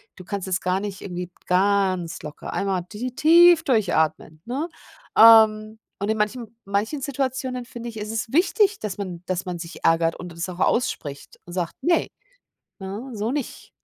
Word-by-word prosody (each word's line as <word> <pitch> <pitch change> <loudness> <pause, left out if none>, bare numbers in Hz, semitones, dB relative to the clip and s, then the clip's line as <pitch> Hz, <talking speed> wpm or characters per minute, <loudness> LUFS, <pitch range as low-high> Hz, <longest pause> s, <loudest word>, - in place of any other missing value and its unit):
du 185 - -11
kannst 195 0 -5
es 185 -1 -1
gar 185 +1 0
nicht 200 -1 -6
irgendwie 180 -2 -5 0.2
ganz 185 -3 +1
locker 150 -1 -7
einmal 190 -3 -1
ti 245 +4 -5
tief 335 +2 +6
durchatmen, 160 - 0
ne? 275 +8 -3 0.5
Ähm, 220 -1 +7 0.2
und 200 +2 -2
in 220 - +1
manchen 225 +1 -3
manchen 205 +9 -1
Situationen 260 -2 -3
finde 235 0 -7
ich, 225 - -10
ist 210 0 -5
es 225 0 -3
wichtig, 400 - +3
dass 205 -3 -5
man 185 -4 -6
dass 185 0 -2
man 175 -2 -5
sich 170 +1 -9
ärgert 165 0 +3
und 180 -1 -9
das 170 +2 -5
auch 180 0 -8
ausspricht 145 - -1
und 175 - -11
sagt: 175 -2 -2
„Ne, 340 +3 +2 0.7
ne, 205 +7 -6
so 215 +3 -2
nicht.“ 285 -3 -5
205 Hz, 175 wpm, -23 LUFS, 180-245 Hz, 0.7 s, Ähm